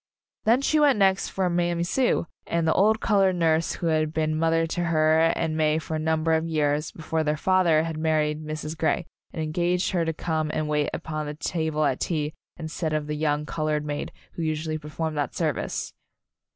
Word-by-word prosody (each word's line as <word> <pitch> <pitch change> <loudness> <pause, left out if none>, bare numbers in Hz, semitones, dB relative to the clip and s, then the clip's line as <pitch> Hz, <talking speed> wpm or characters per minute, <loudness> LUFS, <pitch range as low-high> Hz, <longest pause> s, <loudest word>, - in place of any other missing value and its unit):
Then 240 +5 +4
she 310 +2 +3
went 290 -5 +5
next 195 -1 +3
for 190 -1 0
Mammy 175 -1 0
Sue, 245 +2 +1 0.2
the 165 -1 +1
old 215 +3 +3
colored 195 -3 +3
nurse 165 -1 +2
who - - -5
had 155 -1 +1
been 155 -1 0
mother 165 +1 +2
to 175 +2 -2
her 155 -1 +3 0.2
and 160 -1 -1
May 155 -1 +2
for 160 0 -5
a 155 - -1
number 160 +1 +1
of 160 +1 +1
years 150 -1 0
before 160 0 -2
their 150 0 0
father 175 -3 +3
had 165 -1 -4
married 155 -1 0
Mrs. 155 0 -5
Grey, 165 +2 0 0.3
and 160 - -3
engaged 175 +3 0
her 175 -3 +1
to 165 - 0
come 155 -1 -2
and 155 -1 -1
wait 150 -1 +1
upon 155 -1 -4
the 150 - -5
table 160 -1 -1
at 130 -3 0
tea 155 -3 -1 0.2
instead 160 -1 -3
of 155 -1 -1
the 150 - -3
young 150 0 0
colored 155 -1 -1
maid 145 0 -4 0.2
who - - -6
usually 155 0 -2
per 150 0 -10
formed 160 0 -3
that 145 - -2
service. 155 -5 -2
160 Hz, 200 wpm, -25 LUFS, 155-170 Hz, 0.3 s, went